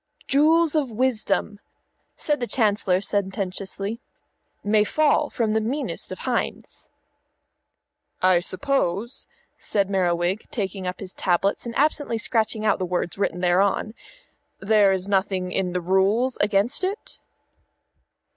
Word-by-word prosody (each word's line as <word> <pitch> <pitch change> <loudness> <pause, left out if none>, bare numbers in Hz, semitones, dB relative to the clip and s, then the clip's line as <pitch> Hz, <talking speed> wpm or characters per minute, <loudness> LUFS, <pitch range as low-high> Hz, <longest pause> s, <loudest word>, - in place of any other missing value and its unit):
"Jewels 315 +3 +4
of 300 -5 +1
wisdom," 220 -3 -1 0.6
said 295 -1 -1
the 240 - -2
Chancellor 205 -6 +1
sententiously, 195 +1 -2 0.6
"may 210 +1 +3
fall 300 +4 +2
from 220 -3 -1
the 220 - +2
meanest 265 +7 -3
of - - -5
hinds." - - -3 1.3
"I 185 -1 +4
suppose," 215 +2 -2 0.3
said 200 -2 -1
Merriwig, 180 +1 0
taking 195 -4 -3
up 180 - -5
his 190 -2 -6
tablets 195 +5 0
and 235 - -6
absently 290 -4 +1
scratching 220 -1 0
out 210 - +2
the - - -1
words 180 +1 -2
written 180 -3 -1
thereon, 190 +4 +2 0.7
"there 205 0 +4
is 190 0 -1
nothing 190 -2 0
in 185 -1 -1
the 180 - -1
rules 195 +8 +2
against 205 - +1
it?" 390 +4 -4
205 Hz, 125 wpm, -24 LUFS, 190-235 Hz, 1.3 s, Jewels